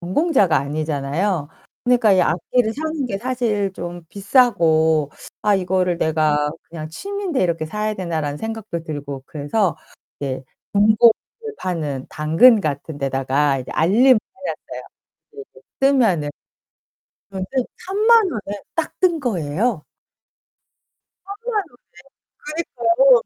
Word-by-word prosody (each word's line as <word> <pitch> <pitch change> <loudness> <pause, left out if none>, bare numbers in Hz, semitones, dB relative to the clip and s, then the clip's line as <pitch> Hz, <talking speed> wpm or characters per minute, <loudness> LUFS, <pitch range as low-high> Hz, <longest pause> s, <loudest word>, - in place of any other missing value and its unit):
전공자가 190 - +2
아니잖아요. 150 +3 -2 0.4
그니까 245 -4 +4
이 185 - +4
악기를 220 +7 +1
사는게 295 -7 -3
사실 225 -5 -1
좀 175 -1 -7
비싸고 165 - +3 0.3
'아 210 -1 +3
이거를 180 -2 0
내가 150 -2 +1 0.2
그냥 155 -2 -7
취미인데 390 - -3
이렇게 165 -3 0
사야 210 +5 -2
되나.'라는 160 -6 -3
생각도 220 -5 -5
들고 145 -4 -6
그래서 165 +6 -1 0.4
이제 135 -2 -3 0.3
중고를 215 +3 +6 0.5
파는 150 -7 -3
당근 165 +10 +5
같은 145 -2 -4
데다가 135 +1 +1
이제 125 - -9
알림을 235 +8 +5 0.2
해놨어요. 275 - -6 0.5
그래서 425 -1 -11 0.3
뜨면은 230 - +3 1.0
그런데 190 -1 -5 0.4
30,000 425 +1 +4
원에 205 -2 -5
딱 325 - -1
뜬 355 -3 +3
거예요. 190 - -1 1.4
30,000 420 +1 -3 0.6
원에 310 +3 -6
그니까요. 240 +1 +5
190 Hz, 255 characters per minute, -21 LUFS, 155-250 Hz, 1.4 s, 중고를